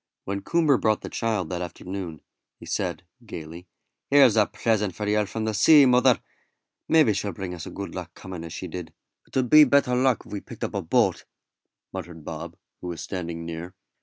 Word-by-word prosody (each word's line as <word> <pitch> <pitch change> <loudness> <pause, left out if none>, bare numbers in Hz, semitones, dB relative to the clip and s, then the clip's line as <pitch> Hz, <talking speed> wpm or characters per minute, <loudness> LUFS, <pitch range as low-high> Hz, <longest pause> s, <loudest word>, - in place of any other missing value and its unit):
When 100 0 -3
Coomber 155 +1 +2
brought 110 -1 +2
the - - -6
child 110 -5 -1
that 90 -1 -3
afternoon, 90 -2 -6 0.4
he - - -11
said, - - -2 0.2
gaily: 85 +3 -9 0.4
"Here's 140 -6 +6
a 105 -2 +4
present 105 -5 0
for 105 - -4
yer 105 0 +2
from 110 +4 -4
the 110 - -1
sea, 145 +8 +7
mother; 125 -1 +4 0.7
maybe 155 -9 +5
she'll 100 0 -3
bring 90 +1 -5
us 85 -2 -7
good 100 0 -6
luck 90 -2 -6
coming 90 -3 -8
as 85 - -8
she 90 +3 -6
did." 85 -1 -7 0.3
"It - - -5
'ud 125 -2 0
be 155 0 +10
better 140 -2 +3
luck 125 -1 +2
if - - -15
we'd 100 -2 -6
picked - - -8
up - - -3
a - - -1
boat," - - +1 0.7
muttered 80 -3 -8
Bob, - - -7 0.2
who 90 - -7
was 85 -2 -5
standing 85 -3 -5
near. 85 +2 -7
100 Hz, 195 wpm, -25 LUFS, 90-115 Hz, 0.7 s, be